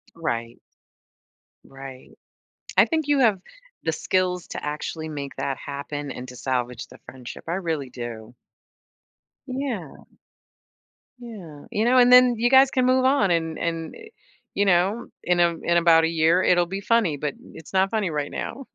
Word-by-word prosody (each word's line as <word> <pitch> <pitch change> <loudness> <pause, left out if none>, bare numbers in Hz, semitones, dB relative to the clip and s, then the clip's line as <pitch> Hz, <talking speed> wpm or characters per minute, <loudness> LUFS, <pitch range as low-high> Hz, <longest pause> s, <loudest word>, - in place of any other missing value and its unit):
Right. 115 -8 -4 1.1
Right. 135 -1 -12 0.6
I - - +7
think 315 -3 -1
you 290 -1 +3
have 215 -7 +3 0.4
the 160 - 0
skills 180 +2 -1
to - - -6
actually 155 +2 -4
make 140 -2 -6
that 135 -1 -2
happen 145 0 -6
and 125 0 -8
to 125 - -10
salvage 125 -2 -3
the 125 - -16
friendship, 125 -2 -10
I 170 - -2
really 160 -7 -3
do. 120 -1 -8 1.1
Yeah. 255 - -4 1.3
Yeah, 190 -12 -10
you 215 +2 0
know, 255 +2 +4
and 245 0 +6
then 250 -1 +7
you 240 +2 +2
guys 265 0 +6
can 255 -1 +1
move 255 0 +3
on, 240 -9 +3
and 165 -1 0
and, 165 -1 -3
eh, 445 0 -13 0.5
you 200 - +2
know, 195 +5 +2 0.2
in 175 0 +1
a 170 -1 +4
in 170 0 +2
about 165 -1 +5
a 165 - +3
year, 165 +2 +3
it'll 175 -1 +3
be 195 +3 -5
funny, 205 -8 +1
but 145 0 -3 0.2
it's 160 - -13
not 190 +2 +2
funny 210 -5 0
right 150 -2 -3
now. 270 +2 -6
170 Hz, 165 wpm, -24 LUFS, 145-225 Hz, 1.3 s, I